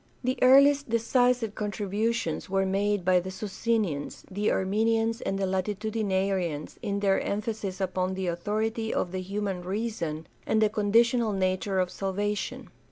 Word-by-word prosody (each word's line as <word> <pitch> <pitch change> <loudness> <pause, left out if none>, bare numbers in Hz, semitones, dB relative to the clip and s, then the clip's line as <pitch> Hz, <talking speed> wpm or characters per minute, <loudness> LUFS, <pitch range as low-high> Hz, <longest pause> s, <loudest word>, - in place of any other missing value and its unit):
The 255 +1 -1
earliest 280 +2 +6
decisive 230 0 +2
contributions 210 -2 -2
were 195 0 +1
made 200 0 0
by 185 -1 +5
the 180 +2 -5
Socinians, 195 -5 -2
the 205 +3 0
Arminians, 225 +4 +1
and 195 - -2
the 195 - 0
Latitudinarians 190 -4 -1
in 200 0 -2
their 195 -1 +3
emphasis 205 -2 -3
upon 185 0 -1
the 190 0 -3
authority 215 +6 -1
of 175 - -1
the 185 0 -3
human 195 -1 -3
reason 180 -5 -3 0.2
and 220 - +2
the 215 -1 +4
conditional 225 +2 +3
nature 190 0 0
of 180 -1 0
salvation. 205 +2 -3
205 Hz, 140 wpm, -27 LUFS, 190-225 Hz, 0.2 s, earliest